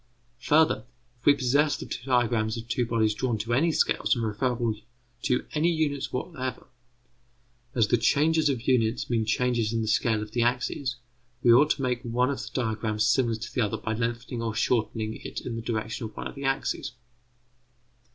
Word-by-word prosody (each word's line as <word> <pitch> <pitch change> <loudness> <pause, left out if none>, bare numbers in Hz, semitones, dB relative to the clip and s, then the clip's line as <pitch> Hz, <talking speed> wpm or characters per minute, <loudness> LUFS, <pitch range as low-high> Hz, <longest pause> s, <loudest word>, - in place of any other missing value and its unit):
Further, 150 +2 +3 0.3
if 120 - -10
we 145 - +8
possess 140 +3 +2
the - - -7
diagrams 120 -3 0
of 115 0 -7
two 120 0 0
bodies 110 -2 +2
drawn 120 +1 -1
to 115 +3 -2
any 160 +7 +3
scales 150 - +2
and 115 -2 -1
referable 115 +1 0 0.5
to 125 - 0
any 160 +3 +2
units 150 -4 -1
whatever, 130 -2 -4 1.1
as 115 -4 +3
the 120 - +3
changes 155 +5 +3
of 125 -3 -3
units 120 -2 +1
mean 115 -2 +1
changes 115 -1 +1
in 115 -1 0
the - - -3
scale 110 0 +1
of 105 - -10
the 120 - 0
axes, 125 +1 0 0.5
we 120 - +7
ought 145 +5 +6
to 135 - 0
make 125 -1 0
one 125 +2 +1
of 140 - -4
the - - -7
diagrams 110 -3 -1
similar 120 0 +2
to 110 +1 -7
the 125 - +1
other 105 -3 0
by 110 - -3
lengthening 115 +1 -3
or 115 -2 -2
shortening 110 -1 0
it - - -7
in 120 - -5
the 115 - -4
direction 110 0 -3
of 110 - -9
one - - -5
of - - -5
the 140 0 -6
axes. 135 -1 -1
120 Hz, 190 wpm, -27 LUFS, 110-130 Hz, 1.1 s, we